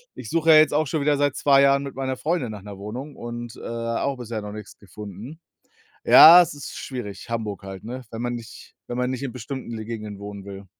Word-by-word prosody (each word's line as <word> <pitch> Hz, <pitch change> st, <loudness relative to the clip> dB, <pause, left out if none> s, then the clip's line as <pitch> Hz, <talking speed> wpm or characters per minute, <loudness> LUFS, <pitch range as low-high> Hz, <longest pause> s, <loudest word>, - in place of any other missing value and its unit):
Ich -, -, -8 dB
suche 165 Hz, -1 st, +1 dB
ja 155 Hz, -, +9 dB
jetzt 155 Hz, -1 st, +5 dB
auch 155 Hz, +1 st, +2 dB
schon 155 Hz, +2 st, -2 dB
wieder 145 Hz, +1 st, +2 dB
seit 145 Hz, -1 st, +1 dB
2 140 Hz, -1 st, +4 dB
Jahren 140 Hz, 0 st, +4 dB
mit 140 Hz, -1 st, -7 dB
meiner 130 Hz, -1 st, -3 dB
Freundin 145 Hz, -3 st, -1 dB
nach 105 Hz, -2 st, -8 dB
'ner 100 Hz, 0 st, -10 dB
Wohnung 120 Hz, +9 st, -7 dB
und, 120 Hz, 0 st, -7 dB
äh, -, -, -13 dB
auch 115 Hz, +4 st, -3 dB
bisher 115 Hz, -3 st, -5 dB
noch 105 Hz, 0 st, -7 dB
nix 105 Hz, -1 st, -10 dB
gefunden. 105 Hz, -, -10 dB, 0.7 s
Ja, 175 Hz, +3 st, +10 dB
es 175 Hz, -, -3 dB
ist 145 Hz, -1 st, -9 dB
schwierig, 120 Hz, -3 st, -7 dB
Hamburg 110 Hz, -4 st, -4 dB
halt, 95 Hz, -1 st, -9 dB
ne, 125 Hz, +3 st, -6 dB
wenn 115 Hz, -, -7 dB
man 120 Hz, 0 st, -2 dB
nicht 115 Hz, -1 st, -10 dB
wenn 120 Hz, -, -4 dB
man 125 Hz, 0 st, 0 dB
nicht 130 Hz, 0 st, -4 dB
in 135 Hz, -3 st, -4 dB
bestimmten 130 Hz, +1 st, -7 dB
le 110 Hz, -2 st, -6 dB
Gegenden 105 Hz, -3 st, -6 dB
wohnen 100 Hz, -1 st, -8 dB
will. 100 Hz, 0 st, -9 dB
120 Hz, 235 wpm, -23 LUFS, 105-140 Hz, 0.7 s, Ja